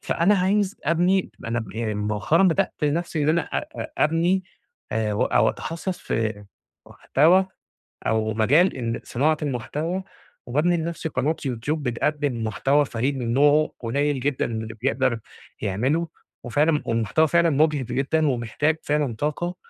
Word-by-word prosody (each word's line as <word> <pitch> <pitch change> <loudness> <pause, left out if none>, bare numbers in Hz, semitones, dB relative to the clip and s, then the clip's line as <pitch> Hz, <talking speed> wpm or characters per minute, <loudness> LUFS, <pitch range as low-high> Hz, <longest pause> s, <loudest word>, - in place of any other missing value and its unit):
فأنا 195 +5 +2
عايز 195 +1 +1
أبني 175 +4 +2
ما - - -8
أنا 120 +1 -1
ب 105 -4 -8
إي 110 0 -2
مؤخرًا 105 - +1
بدأت 170 -5 +2
نفسي 160 +1 -1
إن - - +1
أنا 165 +2 +3
أ - - -3 0.2
أ - - -4
أبني 170 +5 +2 0.5
أو 105 -2 +2
أتخصص 175 +3 -4
في 110 -2 -2 0.4
محتوى 180 +7 +3 0.6
أو 110 -1 +1
مجال 140 - +3
ال 115 -1 -4
صناعة 150 +5 +1
المحتوى 150 - -3 0.4
وبابني 155 +8 +2
لنفسي 165 0 -3
قناة 145 +4 0
YouTube 125 +4 -2
بتقدم 140 -2 -1
محتوى 135 +7 +2
فريد 130 +3 -2
من 120 -2 -2
نوعه 145 +3 +4
قليل 140 +4 0
جدًا 135 +1 0
اللي 110 -1 -4
بيقدر 130 -2 +1 0.4
يعمله 135 - 0 0.4
وفعلًا 150 +5 +2
والمحتوى 115 +7 +2
فعلًا 170 +1 +3
مُجهِد 150 -1 +2
جدًا 150 +5 0
ومحتاج 130 +5 0
فعلًا 145 -6 0
طاقة، 175 +4 -2
145 Hz, 140 wpm, -24 LUFS, 115-165 Hz, 0.6 s, نوعه